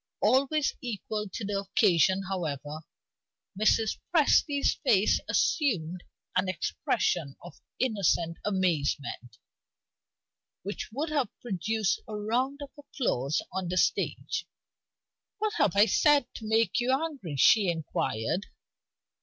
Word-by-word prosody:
Always 275 +6 +2
equal 215 -3 -4
to 210 - -5
the 200 0 -1
occasion, 195 -1 +3
however, 155 -5 -4 0.8
Mrs. 215 +2 +2
Presty's 290 -3 +3
face 210 -7 +3
assumed 180 - 0 0.3
an 185 +1 +1
expression 155 -4 -1
of 175 - -12 0.2
innocent 190 -8 0
amazement, 150 - -1 1.3
which 200 +2 -5
would 290 +7 -3
have 280 -8 0
produced 215 -1 -1
a 215 - -6
round 250 +7 -1
of 280 - -10
applause 155 - -1
on 190 -1 -2
the 180 - -2
stage. - - 0 0.9
"What 430 0 -1
have 200 -4 +2
I 205 +1 +7
said 290 +5 +4
to 220 - -8
make 225 -2 +2
you 245 +1 +1
angry?" 270 - -2
she 195 - +5
inquired. 160 - -2
205 Hz, 110 wpm, -28 LUFS, 175-255 Hz, 1.3 s, I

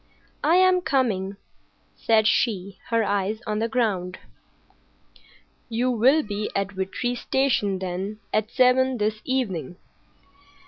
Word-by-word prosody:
"I 315 +4 +4
am 370 0 +4
coming," 205 - 0 0.6
said 220 -1 +2
she, 200 -4 0
her 230 -1 +2
eyes 205 +1 -1
on 210 -1 -2
the 225 - 0
ground. 200 -7 -1 1.5
"You 240 +2 0
will 260 +7 +4
be 210 0 -4
at 195 0 -1
Vitry 195 +6 -3
Station, 245 -6 0
then, 190 +3 -4 0.2
at 215 0 +1
seven 260 0 +3
this 215 0 -1
evening." 200 -10 -2
215 Hz, 120 wpm, -24 LUFS, 195-255 Hz, 1.5 s, I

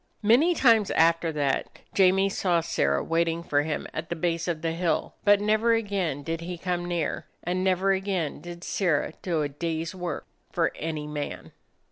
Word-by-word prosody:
Many 270 +12 +5
times 225 -8 +4
after 165 0 +3
that 140 -3 -1 0.2
Jamie 195 0 +4
saw 180 -3 +1
Sirrah 70 - 0
waiting 165 0 0
for 145 -3 +2
him 150 0 -3
at 160 +1 -5
the 170 - -2
base 170 +1 -1
of 165 -2 -2
the 165 - 0
hill, 170 +1 -1
but 205 -1 +5
never 215 +3 +3
again 195 -10 -2
did 165 +1 -3
he 175 +1 -5
come 175 0 -2
near, 170 -4 -2 0.2
and 180 +2 -1
never 190 +1 +2
again 190 -5 -1
did 175 0 -9
Sirrah 165 -5 0
do 165 -4 0
a - - 0
day's 165 +2 -3
work 180 -2 -4 0.3
for - - +1
any 155 -2 -4
man. 150 -1 -5
170 Hz, 175 wpm, -26 LUFS, 160-190 Hz, 0.3 s, Many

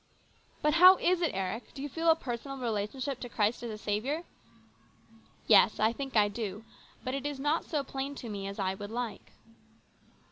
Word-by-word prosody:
" - - -34
But 300 0 +3
how 365 +3 +9
is 360 0 +2
it, 335 - +2
Eric? 195 +5 -4
Do 270 - -6
you - - -2
feel 330 +4 0
a 325 - +7
personal 270 -1 -5
relationship 250 +3 -3
to 245 - -7
Christ 215 0 0
as 240 - -5
a 215 - -5
Saviour? 220 +11 -2 0.4
" - - -33
" 225 - -23 0.3
Yes, 210 0 +6
I 220 +2 +3
think 270 0 -6
I 210 -1 +5
do. 210 -1 -5 0.4
But 255 - -3
it 275 -1 -3
is 290 -2 -5
not 295 +4 0
so 300 -4 -1
plain 275 +1 -4
to 250 - -7
me 200 -2 -5
as 200 - -6
I 190 -2 0
would 205 +1 -7
like." 235 -1 -5
245 Hz, 210 wpm, -30 LUFS, 210-280 Hz, 0.4 s, how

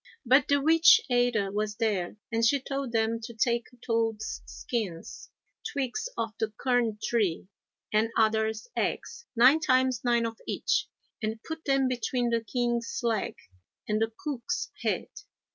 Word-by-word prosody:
But 260 +4 +5
the 285 0 +3
witch 325 +3 +7
Ada 245 -5 +2
was 210 +1 -2
there 210 -4 -1
and 230 0 0
she 275 +5 +4
told 275 -1 -4
them 225 0 +1
to 230 0 -8
take 235 +1 +1 0.2
toads' 225 -2 -1
skins, 200 -9 -5 0.3
twigs 285 - -3
of 225 -1 -1
the 220 -1 -1
cuirn 245 -4 +1
tree, 195 -6 0 0.4
and 215 +1 +3
adders' 220 0 +1
eggs, 470 - -3
nine 255 +7 +6
times 255 -4 +2
nine 235 -1 +2
of 225 -1 -5
each, - - 0 0.3
and 220 +1 -3
put 320 0 -7
them 270 -1 +3
between 245 -1 -1
the 230 0 +1
king's 240 0 -1
leg 225 -3 0 0.5
and 215 0 0
the 225 0 +1
cook's 300 +4 -3
head. - - 0
235 Hz, 145 wpm, -28 LUFS, 220-255 Hz, 0.5 s, witch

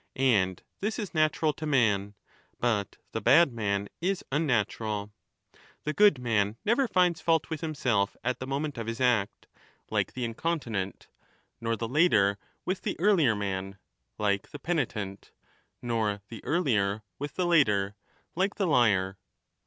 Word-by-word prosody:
And 105 -9 +2 0.2
this 215 +2 -2
is 210 -5 -5
natural 155 -1 +2
to 155 - -6
man; 105 -7 +2 0.4
but 105 -5 0
the 110 - -3
bad 135 +5 +5
man 100 -3 -1
is 190 +2 -1
unnatural. 110 -7 0 0.7
The 150 - -2
good 205 -6 +5
man 110 -3 0
never 245 +5 +3
finds 180 -5 +2
fault 165 -4 +1
with 160 - -3
himself 125 -11 0
at 125 +1 -1
the 130 - -5
moment 140 -1 -2
of 115 - -5
his 115 0 -4
act, 120 -6 +1 0.5
like - - 0
the 125 -1 -2
incontinent, 115 - -3 0.5
nor 115 0 0
the 115 +1 -3
later 110 - +3 0.3
with 185 +1 -2
the - - -3
earlier 170 - +4
man, 95 -1 -3 0.4
like 100 -2 0
the - - -8
penitent, 120 - -3 0.5
nor 110 -4 -1
the 115 -3 -9
earlier 110 - +1 0.2
with 145 0 -5
the 180 - 0
later, 105 - +3 0.4
like 195 +4 0
the 200 - 0
liar. 100 - +2
120 Hz, 145 wpm, -28 LUFS, 105-155 Hz, 0.7 s, bad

